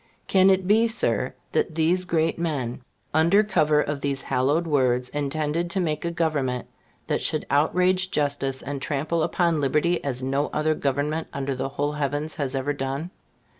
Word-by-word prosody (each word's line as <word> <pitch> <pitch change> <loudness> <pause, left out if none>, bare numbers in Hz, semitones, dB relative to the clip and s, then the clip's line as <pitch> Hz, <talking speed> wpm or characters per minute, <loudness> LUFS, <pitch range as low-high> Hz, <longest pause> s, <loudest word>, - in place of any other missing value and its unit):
Can 190 0 +4
it 190 -1 +3
be, 220 +4 +4
Sir, 225 +1 0 0.2
that 160 - 0
these 170 +3 +2
great 165 -1 0
men, 135 -8 -2 0.3
under 170 +7 +4
cover 155 -7 +2
of 145 -1 -3
those 140 -1 -2
hallowed 145 +7 +1
words, 125 -5 +1
intended 150 +4 -2
to 190 - -1
make 155 -4 -1
a 170 - 0
government 150 -7 -1 0.4
that - - -1
should 155 -1 -1
outrage 180 +6 +2
justice 140 -3 -1
and 140 0 -5
trample 150 +4 -1
upon 165 -1 +1
liberty 155 +5 +1
as 130 -2 -2
no 135 +2 0
other 155 +1 +1
government 145 +3 -1
under 140 0 -2
the 130 +1 -3
whole 145 +1 -1
heavens 150 +2 -2
has 140 -3 -2
ever 135 +2 -1
done? 140 +5 -4
150 Hz, 170 wpm, -25 LUFS, 140-170 Hz, 0.4 s, Can